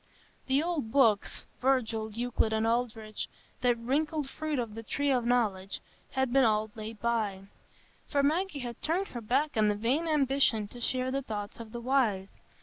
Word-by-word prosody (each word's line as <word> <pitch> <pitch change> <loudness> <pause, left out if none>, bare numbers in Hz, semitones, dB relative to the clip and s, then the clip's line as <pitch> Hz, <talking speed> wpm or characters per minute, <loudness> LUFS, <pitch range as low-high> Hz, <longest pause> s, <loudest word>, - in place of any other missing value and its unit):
The 270 +3 +3
old 320 -10 -2
books, 225 -7 +3 0.2
Virgil, 230 -4 +1
Euclid, 230 0 0
and 220 0 +1
Aldrich—that 235 +1 -2
wrinkled 290 +5 0
fruit 310 +1 -3
of 230 -4 -2
the 225 - -6
tree 285 +5 0
of 245 -3 +1
knowledge—had 240 +3 -1
been 270 0 +6
all 215 -2 +2
laid 220 0 -7
by; 215 -5 0 0.6
for 280 -1 +1
Maggie 315 +1 +1
had 240 -2 -6
turned 360 +5 0
her 240 - -6
back 270 +7 +1
on 215 -1 +4
the 210 - +2
vain 255 +10 0
ambition 270 -7 +2
to 245 - -10
share 255 +2 0
the 275 +1 0
thoughts 210 -4 -5
of 225 -2 -8
the 240 - -5
wise. 230 -7 0
240 Hz, 165 wpm, -30 LUFS, 220-275 Hz, 0.6 s, been